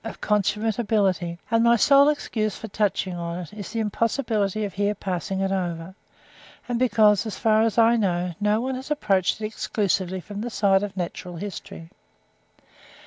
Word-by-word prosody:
of 225 Hz, -, -7 dB
consummate 210 Hz, +2 st, 0 dB
ability; 190 Hz, -6 st, 0 dB
and 230 Hz, 0 st, +3 dB
my 235 Hz, 0 st, +5 dB
sole 280 Hz, +4 st, +6 dB
excuse 215 Hz, -8 st, -2 dB
for 220 Hz, -, -7 dB
touching 195 Hz, -2 st, -1 dB
on 170 Hz, 0 st, -4 dB
it, 180 Hz, +1 st, -8 dB
is 205 Hz, -2 st, -7 dB
the 230 Hz, -, -3 dB
impossibility 215 Hz, -2 st, 0 dB
of 200 Hz, -, -6 dB
here 205 Hz, +1 st, 0 dB
passing 190 Hz, 0 st, -3 dB
it 195 Hz, 0 st, 0 dB
over; 175 Hz, -2 st, -3 dB, 0.7 s
and 240 Hz, -1 st, -1 dB
because, 215 Hz, -4 st, +4 dB
as 215 Hz, -, -5 dB
far 220 Hz, -1 st, +3 dB
as 225 Hz, 0 st, +1 dB
I 230 Hz, +1 st, +5 dB
know, 180 Hz, -4 st, 0 dB
no 210 Hz, +1 st, +2 dB
one 260 Hz, +2 st, -2 dB
has 260 Hz, +2 st, -6 dB
approached 195 Hz, -11 st, +1 dB
it 215 Hz, -, -3 dB
exclusively 195 Hz, -3 st, -1 dB
from 205 Hz, +3 st, -7 dB
the 240 Hz, -, -3 dB
side 195 Hz, -4 st, +2 dB
of 205 Hz, -1 st, -5 dB
natural 180 Hz, 0 st, -5 dB
history. 170 Hz, -2 st, -8 dB
205 Hz, 175 wpm, -24 LUFS, 190-225 Hz, 0.7 s, sole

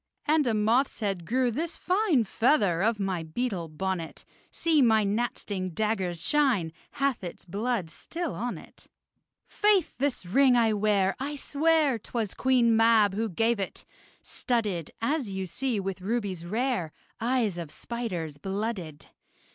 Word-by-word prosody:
And 300 Hz, -2 st, +3 dB
a 225 Hz, -, +2 dB
moth's 230 Hz, +5 st, +1 dB
head 195 Hz, -5 st, -2 dB
grew 250 Hz, 0 st, +2 dB
this 320 Hz, +8 st, -3 dB
fine 365 Hz, -, +2 dB
Feather 205 Hz, -, +2 dB
of 220 Hz, +1 st, +1 dB
my 190 Hz, -3 st, -1 dB
beetle 175 Hz, +1 st, -3 dB
bonnet; 170 Hz, +1 st, -4 dB, 0.3 s
See, 320 Hz, -3 st, +2 dB
my 220 Hz, -4 st, +4 dB
gnat 215 Hz, +4 st, -1 dB
sting 185 Hz, -3 st, -4 dB
dagger's 190 Hz, -6 st, -1 dB
shine 250 Hz, -, +2 dB, 0.2 s
Hath 275 Hz, -7 st, 0 dB
its 175 Hz, -, -7 dB
blood 200 Hz, -1 st, -2 dB
still 340 Hz, -, -5 dB
on 245 Hz, +2 st, -3 dB
it. -, -, -15 dB, 0.6 s
Faith! 415 Hz, -3 st, +2 dB
this 275 Hz, -8 st, -1 dB
ring 255 Hz, +7 st, +4 dB
I 225 Hz, -2 st, +3 dB
wear, 200 Hz, -2 st, +2 dB
I 285 Hz, +3 st, -3 dB
swear, 295 Hz, -2 st, +2 dB
'Twas 220 Hz, -2 st, -3 dB
Queen 245 Hz, -3 st, +3 dB
Mab 225 Hz, -3 st, +5 dB
who 220 Hz, +2 st, -1 dB
gave 225 Hz, +5 st, +1 dB
it: 195 Hz, -, -5 dB, 0.4 s
studded, 210 Hz, -, -2 dB
As 275 Hz, -2 st, 0 dB
you 190 Hz, -1 st, -3 dB
see, 240 Hz, +5 st, -2 dB
with 195 Hz, -1 st, -4 dB
rubies 195 Hz, -5 st, -2 dB
rare 220 Hz, -, -1 dB, 0.3 s
Eyes 230 Hz, -6 st, 0 dB
of 165 Hz, -3 st, -6 dB
spiders 175 Hz, -10 st, -5 dB
blooded. 190 Hz, -5 st, -4 dB
220 Hz, 145 wpm, -28 LUFS, 190-255 Hz, 0.6 s, Mab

